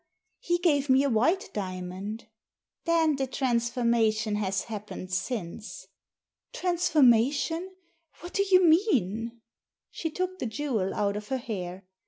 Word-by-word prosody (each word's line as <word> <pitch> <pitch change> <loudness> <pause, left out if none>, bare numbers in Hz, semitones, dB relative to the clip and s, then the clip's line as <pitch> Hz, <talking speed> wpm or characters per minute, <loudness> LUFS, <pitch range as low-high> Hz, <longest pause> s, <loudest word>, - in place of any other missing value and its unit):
He 345 0 0
gave 295 -6 +1
me 265 +1 +5
a 280 - +1
white 320 - +1
diamond." 190 +3 -5 0.6
"Then 325 -3 +3
the 270 -1 -1
transformation 235 -4 +1
has 195 -2 -1
happened 210 -4 -7
since." 210 0 -4 0.3
" - - -57
Transformation? 330 - +2 0.5
What 350 - -9
do 395 - +2
you 370 -1 +6
mean? 235 - +2 0.2
" - - -65
She 325 - -3
took 370 +3 -3
the 250 - -2
jewel 220 -5 -2
out 200 -1 0
of 210 0 -6
her 265 - -1
hair. 190 -6 -6
240 Hz, 135 wpm, -28 LUFS, 210-325 Hz, 0.6 s, you